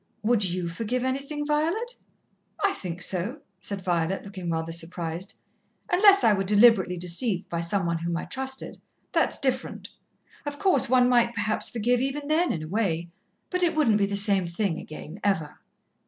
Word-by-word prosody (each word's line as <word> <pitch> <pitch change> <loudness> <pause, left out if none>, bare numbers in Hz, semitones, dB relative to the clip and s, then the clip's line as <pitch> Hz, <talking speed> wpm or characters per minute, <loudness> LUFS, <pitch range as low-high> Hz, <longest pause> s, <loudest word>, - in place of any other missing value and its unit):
"Would 220 -1 +2
you 180 -1 -2
forgive 230 +8 -2
anything, 275 +3 -3
Violet?" 335 +11 0 0.7
"I 395 - +2
think 180 - -5
so," 205 - -3 0.2
said 195 0 -5
Violet, 175 +1 -1
looking 190 -3 -6
rather 165 0 -2
surprised. 170 +2 -4 0.6
"Unless 395 +2 +6
I 220 - +6
were 195 - 0
deliberately 205 -2 +5
deceived 180 +3 -1
by 170 -1 -2
some 170 +2 0
one 170 -1 -1
whom 170 0 -2
I - - -4
trusted. 265 0 -4 0.3
That's - - +1
different. - - -2 0.5
Of 290 -1 -5
course, 360 - +2
one 250 -1 +5
might 240 -1 +3
perhaps 215 0 0
forgive 240 +2 +1
even 280 +2 -2
then 335 +3 +2
in 155 - -3
a - - -6
way 175 -4 -1 0.4
but 365 0 0
it 345 -3 +2
wouldn't 235 -9 +3
be 200 - +2
the 200 - -2
same 200 -3 +3
thing 170 0 -2
again, 155 +4 -9
ever." 160 -7 -1
205 Hz, 170 wpm, -26 LUFS, 175-265 Hz, 0.7 s, Unless